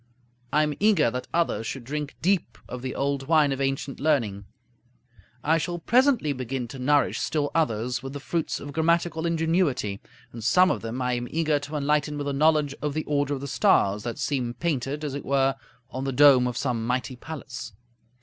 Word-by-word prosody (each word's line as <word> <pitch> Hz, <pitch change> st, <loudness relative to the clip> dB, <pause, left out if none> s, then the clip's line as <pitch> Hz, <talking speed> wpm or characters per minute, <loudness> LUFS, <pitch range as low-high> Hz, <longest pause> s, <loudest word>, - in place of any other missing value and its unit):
I 150 Hz, -, +3 dB
am 150 Hz, -1 st, 0 dB
eager 195 Hz, -, +4 dB
that 125 Hz, +1 st, -5 dB
others 165 Hz, -9 st, 0 dB
should 135 Hz, -, -5 dB
drink 145 Hz, +3 st, -4 dB
deep 190 Hz, 0 st, +1 dB
of 125 Hz, -, -6 dB
the 130 Hz, 0 st, -4 dB
old 140 Hz, -1 st, -1 dB
wine 155 Hz, -3 st, +4 dB
of 135 Hz, 0 st, -2 dB
ancient 135 Hz, 0 st, -2 dB
learning; 115 Hz, -10 st, 0 dB, 1.0 s
I 160 Hz, +2 st, +3 dB
shall 175 Hz, +2 st, -3 dB
presently 240 Hz, -, +3 dB
begin 130 Hz, -1 st, -4 dB
to 135 Hz, -, -8 dB
nourish 145 Hz, +3 st, +2 dB
still 145 Hz, +1 st, -1 dB
others 125 Hz, -5 st, 0 dB
with 135 Hz, +1 st, -7 dB
the 145 Hz, -, -5 dB
fruits 165 Hz, +3 st, -2 dB
of 145 Hz, 0 st, -8 dB
grammatical 165 Hz, +1 st, +1 dB
ingenuity; 160 Hz, -, 0 dB, 0.3 s
and 115 Hz, -2 st, -8 dB
some 185 Hz, +10 st, +5 dB
of -, -, -2 dB
them 115 Hz, +3 st, -4 dB
I 125 Hz, 0 st, 0 dB
am 120 Hz, 0 st, -2 dB
eager 155 Hz, -2 st, +1 dB
to 145 Hz, +2 st, -7 dB
enlighten 150 Hz, 0 st, 0 dB
with 145 Hz, -1 st, -3 dB
a 140 Hz, -, -1 dB
knowledge 150 Hz, 0 st, +3 dB
of 150 Hz, -1 st, -2 dB
the 155 Hz, -, -1 dB
order 145 Hz, -1 st, 0 dB
of 135 Hz, -, -7 dB
the 140 Hz, -, -5 dB
stars, 100 Hz, -5 st, +3 dB
that 120 Hz, +1 st, -5 dB
seem 125 Hz, -4 st, -2 dB
painted, 150 Hz, -3 st, -2 dB
as 145 Hz, -3 st, -3 dB
it 140 Hz, -, -5 dB
were, 135 Hz, 0 st, +2 dB, 0.4 s
on 130 Hz, +1 st, -4 dB
the 135 Hz, -, -1 dB
dome 135 Hz, -2 st, +6 dB
of 125 Hz, -1 st, -3 dB
some 120 Hz, -4 st, -1 dB
mighty 125 Hz, 0 st, -1 dB
palace. 125 Hz, -5 st, -8 dB
140 Hz, 195 wpm, -26 LUFS, 125-155 Hz, 1.0 s, dome